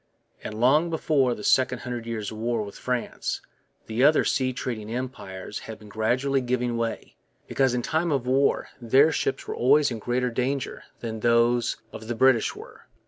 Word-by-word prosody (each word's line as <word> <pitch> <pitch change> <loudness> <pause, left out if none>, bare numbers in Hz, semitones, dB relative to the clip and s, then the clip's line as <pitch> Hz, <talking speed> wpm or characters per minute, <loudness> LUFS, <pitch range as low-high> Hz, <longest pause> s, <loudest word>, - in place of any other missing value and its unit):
And 110 0 -6
long 150 +8 +4
before 145 -6 +1
the 105 - -9
Second 125 +1 +3
Hundred 120 -2 -5
Years' 110 -2 -4
War 115 0 -1
with 100 -1 -9
France 125 -2 -3 0.5
the 115 +3 0
other 150 +2 +5
sea 130 -1 +1
trading 115 -4 -5
empires 115 -6 -5
had 110 - -6
been 105 - -14
gradually 125 +6 +1
giving 125 -1 -1
way, 115 -1 -4 0.3
because 130 -2 +1
in 120 - -1
time 160 +4 0
of 135 -4 0
war 135 +2 +2
their 135 +7 +5
ships 415 - -2
were 430 - -3
always 150 - +4
in 115 - -4
greater 125 +2 -1
danger 130 +3 -2 0.2
than 110 -2 -4
those 120 +1 +2 0.2
of 110 - -9
the 120 - -2
British 130 -1 +3
were. - - -13
125 Hz, 175 wpm, -26 LUFS, 115-135 Hz, 0.5 s, other